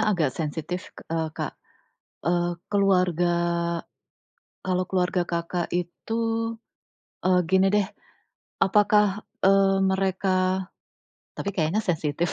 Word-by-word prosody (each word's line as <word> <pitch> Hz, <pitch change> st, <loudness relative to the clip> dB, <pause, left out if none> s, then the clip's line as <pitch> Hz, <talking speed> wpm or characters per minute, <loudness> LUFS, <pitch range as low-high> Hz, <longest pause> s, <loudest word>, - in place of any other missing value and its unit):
agak 180 Hz, -, +2 dB
sensitif, 160 Hz, +3 st, -4 dB, 0.2 s
eee, 160 Hz, -1 st, 0 dB
Kak. -, -, -3 dB, 0.7 s
Eee, 175 Hz, +1 st, 0 dB
keluarga 180 Hz, -4 st, +2 dB, 1.3 s
kalau 185 Hz, 0 st, +1 dB
keluarga 180 Hz, -1 st, 0 dB
Kakak 170 Hz, 0 st, -2 dB
itu 180 Hz, +5 st, -3 dB, 1.1 s
eee, 185 Hz, -1 st, +4 dB
gini 190 Hz, +1 st, +4 dB
deh, 205 Hz, -2 st, +2 dB, 0.8 s
apakah, 210 Hz, 0 st, +3 dB, 0.2 s
eee, 195 Hz, 0 st, +5 dB
mereka 190 Hz, 0 st, +1 dB, 0.7 s
tapi 200 Hz, -, -3 dB
kayaknya 185 Hz, +4 st, 0 dB
sensitif, 165 Hz, -1 st, 0 dB
185 Hz, 95 wpm, -25 LUFS, 175-195 Hz, 1.3 s, eee